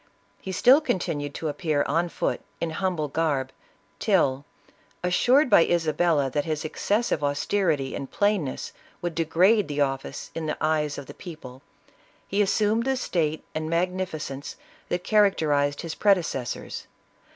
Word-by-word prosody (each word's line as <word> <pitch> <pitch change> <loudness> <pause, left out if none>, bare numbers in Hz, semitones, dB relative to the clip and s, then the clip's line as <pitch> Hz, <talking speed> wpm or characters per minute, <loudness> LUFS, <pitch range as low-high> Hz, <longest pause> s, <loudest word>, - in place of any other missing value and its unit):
He 190 - -6
still 255 - +6
continued 145 - -2
to 160 - -3
appear 150 -1 0
on 170 +4 0
foot, - - -2 0.2
in 170 - -2
humble 175 -3 -1
garb, 140 -3 -1 0.5
till 145 -10 +2 0.6
assured 245 +11 +4
by 170 - +6
Isabella 160 -4 +1
that 145 +2 0
his 155 -2 -3
excessive 205 0 0
austerity 145 0 0
and 135 - -5
plainness 205 -10 -1 0.3
would 175 -1 -2
degrade 180 +6 +3
the 145 0 -2
office 135 0 -2
in 160 -1 -4
the 150 - -2
eyes 155 -1 0
of 140 - -6
the - - -10
people, 135 -7 -10 0.7
he 200 +2 +1
assumed 210 +3 +2
the 265 0 +1
state 160 -9 -1
and 155 0 -3
magnificence 170 -5 -2 0.3
that 175 0 -1
characterized 155 -10 +2
his 165 -2 -5
predecessors. 175 -11 0
160 Hz, 140 wpm, -25 LUFS, 145-190 Hz, 0.7 s, still